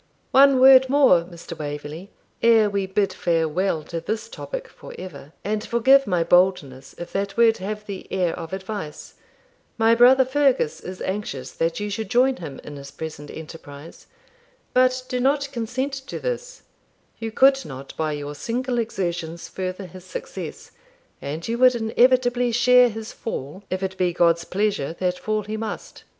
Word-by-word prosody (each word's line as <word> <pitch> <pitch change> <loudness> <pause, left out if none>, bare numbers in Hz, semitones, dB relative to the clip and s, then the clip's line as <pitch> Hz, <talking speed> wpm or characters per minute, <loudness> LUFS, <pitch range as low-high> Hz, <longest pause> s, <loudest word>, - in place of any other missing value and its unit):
'One 275 -1 +6
word 260 0 +8
more, 265 -11 +5
Mr. 170 -1 -10
Waverley, 150 +4 -6 0.3
ere 225 -3 +5
we 200 -1 -1
bid 195 +1 0
farewell 165 0 0
to 165 +2 -5
this 220 +5 -4
topic - - -6
for - - -12
ever; 150 -6 -9
and 210 +1 -2
forgive 265 +4 +4
my 180 -3 +1
boldness 165 -7 +1
if 175 - -8
that 195 +1 -2
word 230 -1 +5
have 210 +2 -5
the 200 -2 -8
air 180 -3 0
of 165 -2 -7
advice. 190 -4 -6 0.6
My 225 0 +4
brother 255 +3 +6
Fergus 265 - +1
is 185 0 -8
anxious 140 -10 -4
that 165 +3 -1
you 205 0 -3
should 220 0 -4
join 255 +3 +3
him 145 -6 -8
in 145 - -9
his 140 0 -9
present 150 -2 -8
enterprise. 155 -1 -11 0.7
But 255 0 +3
do 250 - -2
not 280 +2 +1
consent 260 +3 -3
to - - -5
this; - - -5 0.6
you 225 -1 -4
could 270 +3 +4
not, 135 -1 -9
by 155 -1 -1
your 145 0 -5
single 240 - -2
exertions, 175 -7 -3
further 185 +1 -5
his 185 +1 -12
success, - - -8 0.5
and 150 +4 -5
you 230 +1 -2
would 255 -1 +6
inevitably 245 +1 +2
share 250 +1 +5
his 220 0 -7
fall, 185 - -6
if 185 +1 -3
it 190 0 -3
be 180 -1 +1
God's 170 -1 +2
pleasure 195 -6 -1
that 180 -1 -1
fall 215 0 -1
he 215 +2 -5
must. 220 -1 -7
200 Hz, 165 wpm, -23 LUFS, 170-245 Hz, 0.7 s, word